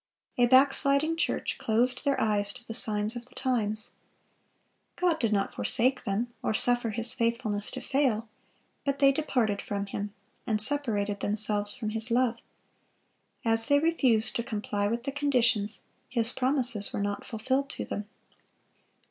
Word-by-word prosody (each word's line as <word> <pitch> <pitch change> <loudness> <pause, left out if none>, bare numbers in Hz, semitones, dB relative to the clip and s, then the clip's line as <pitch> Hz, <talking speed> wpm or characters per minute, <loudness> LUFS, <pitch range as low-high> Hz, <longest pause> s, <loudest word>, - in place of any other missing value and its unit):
A 245 - +5
backsliding 275 +4 +3
church 330 - -2
closed 245 +4 +1
their 280 -1 +1
eyes 205 -2 +1
to 240 - -12
the 225 - -6
signs 215 0 +1
of 240 0 -8
the 255 - -22
times. 220 -5 -1 1.0
God 350 -3 0
did 230 -3 0
not 200 -2 0
forsake 255 +2 +1
them, 230 +5 -2
or 220 - -1
suffer 245 0 +4
His 230 +2 +5
faithfulness 230 -4 -1
to - - -6
fail; 250 -5 0 0.6
but 280 -1 -1
they 275 -1 +5
departed 250 -8 -1
from 200 -1 -4
Him, 205 +1 -5 0.4
and 215 -2 0
separated 215 -6 -1
themselves 205 0 0
from 215 -3 -4
His 225 +2 +4
love. 240 0 +1 1.1
As 225 0 +1
they 285 0 +4
refused 275 -8 +1
to 235 - -2
comply 205 -2 -2
with 235 +2 -2
the 275 - -3
conditions, 245 -7 +1 0.3
His 235 -2 0
promises 250 -6 +1
were - - -3
not 205 0 -3
fulfilled 260 +4 -2
to - - -5
them. 205 0 -6
235 Hz, 155 wpm, -28 LUFS, 210-260 Hz, 1.1 s, A